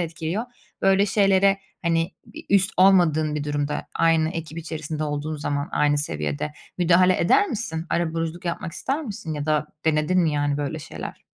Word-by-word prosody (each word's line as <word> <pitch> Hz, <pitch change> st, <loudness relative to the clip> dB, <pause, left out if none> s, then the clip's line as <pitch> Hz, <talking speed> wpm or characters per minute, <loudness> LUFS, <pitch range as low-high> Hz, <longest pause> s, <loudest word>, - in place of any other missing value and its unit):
etkiliyor. 170 Hz, +5 st, -3 dB, 0.4 s
Böyle 195 Hz, +1 st, +4 dB
şeylere, 195 Hz, -1 st, +3 dB, 0.2 s
hani, 165 Hz, +1 st, +1 dB
bir -, -, -11 dB
üst 195 Hz, -1 st, +4 dB
olmadığın 170 Hz, -5 st, +4 dB
bir 150 Hz, -1 st, -2 dB
durumda, 145 Hz, 0 st, -2 dB
aynı 165 Hz, -1 st, +3 dB
ekip 165 Hz, -1 st, -6 dB
içerisinde 155 Hz, -1 st, -4 dB
olduğun 150 Hz, +1 st, -3 dB
zaman 145 Hz, 0 st, -2 dB
aynı 145 Hz, 0 st, +2 dB
seviyede 75 Hz, -, -2 dB, 0.3 s
müdahale 180 Hz, +1 st, +4 dB
eder 405 Hz, -, +4 dB
misin? 175 Hz, -, -4 dB
Arabuluculuk 165 Hz, 0 st, -2 dB
yapmak 170 Hz, -1 st, -3 dB
ister 280 Hz, +4 st, -2 dB
misin 200 Hz, -, -5 dB
ya 145 Hz, 0 st, -4 dB
da 155 Hz, 0 st, +1 dB, 0.2 s
denedin 160 Hz, +3 st, +2 dB
mi, 160 Hz, -3 st, +2 dB
yani, 145 Hz, -1 st, 0 dB
böyle 145 Hz, +2 st, -3 dB
şeyler? 80 Hz, -, -8 dB
160 Hz, 160 wpm, -24 LUFS, 150-180 Hz, 0.4 s, Böyle